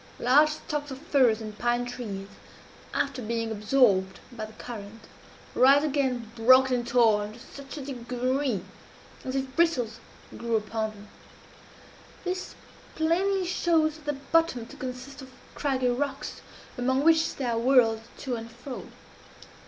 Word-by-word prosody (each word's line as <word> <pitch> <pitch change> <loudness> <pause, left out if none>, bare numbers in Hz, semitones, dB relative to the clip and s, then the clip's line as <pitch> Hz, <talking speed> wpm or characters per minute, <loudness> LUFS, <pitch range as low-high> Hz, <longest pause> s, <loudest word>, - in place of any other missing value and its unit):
Large 285 +5 +5
stocks 300 -1 -4
of 265 - -6
firs 260 -6 +3
and 215 -1 -7
pine 240 0 +1
trees, 220 -6 -6 0.6
after 275 -2 -1
being 230 0 -2
absorbed 210 -4 +2
by 225 -3 -5
the 215 - -13
current, 220 -1 -9 0.5
rise 275 +3 +6
again 265 -6 -1
broken 255 +2 +5
and 240 0 -4
torn 220 -4 +3
to 235 - -13
such 275 +3 -10
a 280 - -6
degree 255 -2 -1 0.6
as 260 - -4
if 265 -1 -3
bristles 250 -10 +1 0.4
grew 235 -1 -1
upon 220 0 -1
them. 210 -1 -13 1.2
This 370 0 -4 0.4
plainly 370 +4 +1
shows 320 -3 +1
the 295 -1 -3
bottom 280 -3 +1
to - - -12
consist 260 +2 -7
of 260 - -11 0.2
craggy 265 -3 0
rocks, 275 +3 -3 0.4
among 260 +2 +1
which 320 0 +4
they 270 - -3
are 230 -1 0
whirled 230 -3 +4 0.2
to 260 - -3
and 230 0 -7
fro. 245 +3 -8
255 Hz, 140 wpm, -27 LUFS, 230-280 Hz, 1.2 s, rise